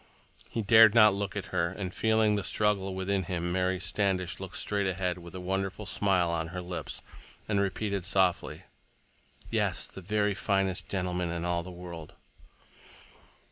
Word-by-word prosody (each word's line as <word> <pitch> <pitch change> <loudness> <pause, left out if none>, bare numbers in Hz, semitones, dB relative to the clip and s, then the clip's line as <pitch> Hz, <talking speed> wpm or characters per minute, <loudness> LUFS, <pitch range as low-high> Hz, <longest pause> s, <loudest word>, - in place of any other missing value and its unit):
He 115 - -2
dared 110 +1 +7
not 105 -3 +7
look 100 0 -3
at 100 -2 -5
her, 85 -2 +2
and 95 0 -5
feeling 110 -1 +3
the 100 -2 0
struggle 100 -3 0
within 95 0 -1
him 90 -1 -2
Mary 95 0 0
Standish 95 -1 -1
looked 95 -1 -6
straight 100 -1 0
ahead 90 -1 -1
with 85 0 -11
a - - -5
wonderful 95 +3 -3
smile 90 -2 +1
on 80 -1 -1
her 90 +2 -6
lips 90 0 -6 0.4
and 100 -2 +1
repeated 100 0 -1
softly, 95 -1 +1 0.9
"Yes, - - +1
the 95 - -10
very 105 +2 +1
finest 95 -2 -1
gentleman 90 -2 -1
in 85 0 -3
all 85 -1 0
the 90 - -9
world!" 85 -3 -9
95 Hz, 160 wpm, -29 LUFS, 90-100 Hz, 0.9 s, dared